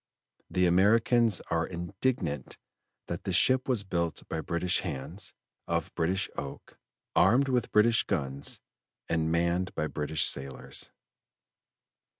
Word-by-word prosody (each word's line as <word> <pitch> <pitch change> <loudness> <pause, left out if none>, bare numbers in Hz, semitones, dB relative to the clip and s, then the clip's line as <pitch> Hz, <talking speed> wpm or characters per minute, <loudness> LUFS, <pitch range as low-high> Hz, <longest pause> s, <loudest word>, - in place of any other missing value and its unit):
The 90 0 +2
Americans 110 +5 +4
are - - +1
indignant 85 - -2 0.5
that - - -5
the - - -2
ship 130 0 +3
was 120 -6 +2
built 85 -4 -2
by 80 - -3
British 85 +2 0
hands, 85 +4 -5 0.3
of 85 -1 -1
British 90 +4 0
oak, 70 -1 -8 0.4
armed 125 +8 +5
with 125 -2 0
British 115 +2 +5
guns, 70 +1 -2 0.5
and 80 -1 0
manned 85 +2 0
by - - 0
British 75 0 0
sailors." 70 -1 -2
90 Hz, 120 wpm, -29 LUFS, 80-105 Hz, 0.5 s, armed